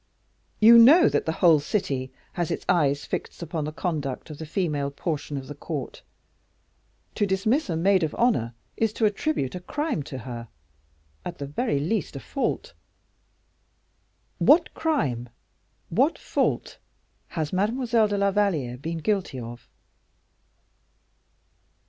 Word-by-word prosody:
You 230 Hz, +2 st, +9 dB
know 290 Hz, +10 st, +8 dB
that -, -, -1 dB
the -, -, +2 dB
whole 160 Hz, -3 st, +7 dB
city 140 Hz, -5 st, -2 dB, 0.2 s
has 175 Hz, -3 st, -2 dB
its -, -, -3 dB
eyes 145 Hz, -5 st, +2 dB
fixed -, -, -5 dB
upon 160 Hz, -2 st, -3 dB
the 155 Hz, -, -3 dB
conduct 155 Hz, -3 st, -3 dB
of 150 Hz, -, -9 dB
the 160 Hz, -, -6 dB
female 150 Hz, -5 st, -1 dB
portion 145 Hz, 0 st, -4 dB
of 135 Hz, -, -6 dB
the 145 Hz, -, -7 dB
court. 145 Hz, -2 st, -6 dB, 1.1 s
To 205 Hz, -, 0 dB
dismiss 210 Hz, +8 st, +1 dB
a 165 Hz, -, 0 dB
maid 190 Hz, +3 st, +3 dB
of 160 Hz, -2 st, -1 dB
honor 120 Hz, -, +1 dB, 0.2 s
is 225 Hz, -1 st, 0 dB
to 225 Hz, -, +1 dB
attribute 210 Hz, -, 0 dB
a 180 Hz, -, -4 dB
crime 290 Hz, -, -2 dB
to 130 Hz, -, -6 dB
her 120 Hz, -1 st, -7 dB, 0.8 s
at 175 Hz, -, -6 dB
the 140 Hz, -, -5 dB
very 145 Hz, -, -1 dB
least 170 Hz, +3 st, -2 dB
a -, -, -4 dB
fault. 275 Hz, -, -3 dB, 1.7 s
What 325 Hz, +3 st, +5 dB
crime, 135 Hz, -, -1 dB, 0.6 s
what -, -, +2 dB
fault -, -, -1 dB, 0.6 s
has 155 Hz, 0 st, -2 dB
Mademoiselle 225 Hz, +3 st, +2 dB
de 205 Hz, -1 st, -1 dB
la 200 Hz, 0 st, +2 dB
Valliere 165 Hz, -12 st, 0 dB
been 165 Hz, +5 st, -4 dB
guilty 180 Hz, -5 st, -1 dB
of?" 120 Hz, 0 st, -9 dB
165 Hz, 140 wpm, -25 LUFS, 140-210 Hz, 1.7 s, You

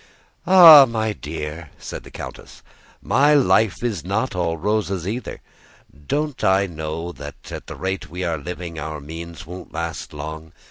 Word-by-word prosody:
"Ah, 165 Hz, -7 st, +10 dB
my 110 Hz, -2 st, -1 dB
dear," 80 Hz, -1 st, -6 dB
said -, -, -7 dB
the -, -, -12 dB
countess, -, -, -10 dB, 0.4 s
"my 145 Hz, +2 st, +4 dB
life 110 Hz, -, +3 dB
is 110 Hz, -8 st, -2 dB
not 100 Hz, +8 st, -1 dB
all 85 Hz, -2 st, -1 dB
roses 100 Hz, -1 st, -1 dB
either. 115 Hz, +3 st, -5 dB, 0.7 s
Don't 150 Hz, -2 st, -2 dB
I 95 Hz, +1 st, +4 dB
know 80 Hz, 0 st, -5 dB
that 75 Hz, -3 st, -10 dB
at -, -, -7 dB
the -, -, -7 dB
rate 95 Hz, -2 st, -4 dB
we 90 Hz, +3 st, -5 dB
are 85 Hz, -3 st, -1 dB
living 85 Hz, +1 st, -6 dB
our 75 Hz, 0 st, -5 dB
means 80 Hz, +4 st, -9 dB
won't 90 Hz, +3 st, -10 dB
last 85 Hz, 0 st, -5 dB
long? 80 Hz, +2 st, -8 dB
90 Hz, 155 wpm, -21 LUFS, 80-110 Hz, 0.7 s, Ah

